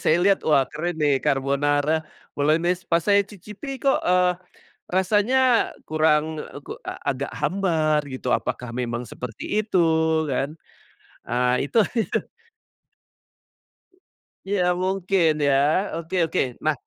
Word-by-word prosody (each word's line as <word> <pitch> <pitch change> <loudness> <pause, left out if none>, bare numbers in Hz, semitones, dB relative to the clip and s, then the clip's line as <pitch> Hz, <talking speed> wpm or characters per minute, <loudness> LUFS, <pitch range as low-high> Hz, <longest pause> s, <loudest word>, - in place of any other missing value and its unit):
saya 155 - +4
lihat 195 0 +4
wah 140 -3 +5
keren 170 +2 -3
nih 145 -3 +2
carbonara, 145 +3 +1 0.3
bolognese 170 +5 0
pas 170 0 +2
saya 200 -1 +5
cicipi 210 - -8
kok, 270 +1 +1
eee, 180 0 +3 0.6
rasanya 205 +7 +2 0.5
kurang, 155 0 +1
eee, - - -10
ku - - -6
a - - -5 0.2
agak - - -2
hambar 160 -6 +1
gitu, 130 0 -6
apakah 125 -1 -4
memang 120 -1 -3
seperti 125 - -4
itu 210 -3 -1 0.5
kan, 140 +3 -2 0.7
eee, 125 +3 +1
itu - - -1 0.2
itu. - - -1 2.3
Iya 180 -3 +2
mungkin 185 -2 +1
ya, 145 +6 +2
oke 165 +3 -5
oke 160 - 0 0.2
nah, 155 - +3
160 Hz, 120 wpm, -23 LUFS, 140-185 Hz, 2.3 s, wah